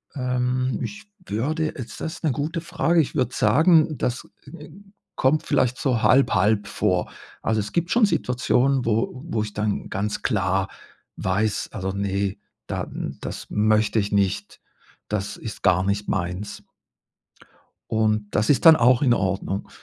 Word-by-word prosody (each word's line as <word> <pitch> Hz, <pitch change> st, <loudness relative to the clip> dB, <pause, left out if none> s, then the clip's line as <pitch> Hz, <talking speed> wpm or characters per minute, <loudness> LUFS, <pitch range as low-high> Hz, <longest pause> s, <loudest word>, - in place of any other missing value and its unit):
Ähm. 125 Hz, 0 st, -1 dB
Ich 215 Hz, +2 st, -6 dB, 0.2 s
würde 150 Hz, +10 st, -1 dB
jetzt, 130 Hz, -6 st, -6 dB
das 160 Hz, -, -3 dB
ist -, -, -18 dB
'ne 155 Hz, -, +2 dB
gute 155 Hz, +6 st, -3 dB
Frage, 170 Hz, 0 st, +2 dB
ich 150 Hz, -, -4 dB
würde 130 Hz, -3 st, 0 dB
sagen, 155 Hz, +6 st, +4 dB
das, 125 Hz, 0 st, -2 dB, 0.3 s
äh, 150 Hz, 0 st, -11 dB, 0.5 s
kommt 145 Hz, +4 st, +2 dB
vielleicht 130 Hz, -3 st, +1 dB
so 125 Hz, -5 st, 0 dB
halb, 135 Hz, +2 st, +4 dB
halb 105 Hz, +2 st, +2 dB
vor. 90 Hz, -1 st, 0 dB, 0.3 s
Also, 110 Hz, -1 st, 0 dB
es 105 Hz, -, -6 dB
gibt 170 Hz, +1 st, -1 dB
schon 235 Hz, -2 st, +5 dB
Situationen, 130 Hz, -4 st, +1 dB
wo 115 Hz, +3 st, -1 dB
wo 115 Hz, -10 st, -1 dB
ich 105 Hz, -, -7 dB
dann 105 Hz, -1 st, -2 dB
ganz 105 Hz, +2 st, -2 dB
klar 95 Hz, -4 st, 0 dB, 0.5 s
weiß: 105 Hz, +3 st, -1 dB
„Also, 95 Hz, -2 st, -3 dB
ne 100 Hz, 0 st, -2 dB, 0.3 s
da -, -, -3 dB, 0.3 s
das -, -, -6 dB
möchte 110 Hz, +1 st, +2 dB
ich 100 Hz, 0 st, -2 dB
nicht. 100 Hz, -2 st, 0 dB, 0.5 s
Das 100 Hz, -1 st, -3 dB
ist 110 Hz, -, -8 dB
gar 90 Hz, -1 st, +4 dB
nicht 100 Hz, +1 st, -1 dB
meins." 90 Hz, +4 st, -3 dB, 1.3 s
Und 110 Hz, -1 st, +1 dB
das 105 Hz, +1 st, 0 dB
ist 145 Hz, -, +3 dB
dann 165 Hz, -1 st, +10 dB
auch 125 Hz, -3 st, +4 dB
in 130 Hz, -4 st, +4 dB
Ordnung. 95 Hz, -1 st, -2 dB
110 Hz, 155 wpm, -23 LUFS, 100-135 Hz, 1.3 s, dann